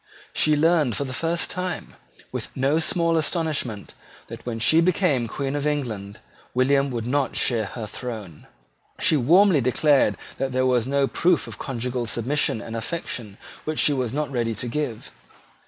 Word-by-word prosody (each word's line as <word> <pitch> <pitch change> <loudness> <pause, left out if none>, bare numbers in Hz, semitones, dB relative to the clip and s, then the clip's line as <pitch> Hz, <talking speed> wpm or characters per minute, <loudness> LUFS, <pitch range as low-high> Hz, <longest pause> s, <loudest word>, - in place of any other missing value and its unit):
She 155 0 +4
learned 155 -6 +3
for - - -1
the 130 -2 -6
first 165 +4 0
time, 180 -1 -4 0.4
with - - -4
no 140 +4 +2
small 165 0 +2
astonishment, 155 - -1 0.4
that, - - -9
when 115 -2 -2
she 160 +8 +5
became 165 -8 +2
Queen 135 +5 -3
of 145 0 -1
England, 110 -9 -3 0.4
William 135 +2 +3
would 120 -3 -3
not 135 +2 0
share 115 -4 +1
her 110 +2 -6
throne. 105 -8 -7 0.5
She - - +4
warmly 165 +4 +5
declared 130 -3 +3 0.2
that 135 -1 -1
there 130 0 +2
was 125 -2 +2
no 140 0 +2
proof 175 +4 +2
of - - -9
conjugal 125 -2 -3
submission 120 0 +1
and 115 - -7
affection 115 -5 -4 0.3
which 155 0 -3
she 145 - +4
was 130 -4 -1
not 150 +2 -2
ready 115 -3 -1
to 120 - -4
give. 120 -3 -4
135 Hz, 165 wpm, -24 LUFS, 120-155 Hz, 0.5 s, she